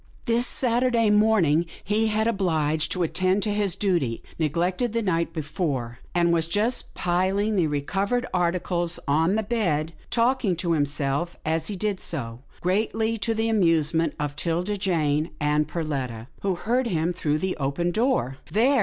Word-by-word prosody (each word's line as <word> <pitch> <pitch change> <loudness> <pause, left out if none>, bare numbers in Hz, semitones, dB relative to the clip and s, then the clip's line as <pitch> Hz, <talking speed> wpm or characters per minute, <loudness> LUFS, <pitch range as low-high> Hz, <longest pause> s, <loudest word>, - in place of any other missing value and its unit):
This 235 +1 +2
Saturday 240 -3 +2
morning 200 -7 +3 0.2
he 215 +2 +1
had 215 0 +1
been 230 -1 +1
obhged 160 -4 +1
to 180 - 0
attend 185 +4 +1
to 210 - 0
this 205 -4 0
duty, 170 - 0 0.2
neg 155 0 0
lected 185 +7 0
the 230 -1 0
night 170 -4 0
before, 145 -7 -3 0.2
and 170 -1 +3
he - - +3
was 165 -1 +1
just 210 +8 0
piling 190 +4 +1
the 175 -5 +2
recovered 195 - -1
articles 175 -1 0
on 160 +7 +2
the 220 - 0
bed, 170 -9 0 0.2
talking 235 -5 +2
to 170 0 -1
himself 145 +1 0
as 160 0 0
he 210 - -3
did 200 0 -1
so, 120 -7 -4 0.2
greatly 220 +4 0
to 225 +3 0
the 225 +1 0
amusement 165 -6 +2
of 145 -1 -2
'Tilda 175 +7 -1
Jane 160 -5 0
and 150 0 +1
Perletta, 135 -9 -3 0.2
who 195 -2 0
heard 240 +7 0
him 170 -3 0
through 150 -4 0
the 185 +3 -2
open 150 +5 -1
door. 150 - 0
" - - -22
There 255 +7 +3
175 Hz, 170 wpm, -25 LUFS, 155-210 Hz, 0.2 s, morning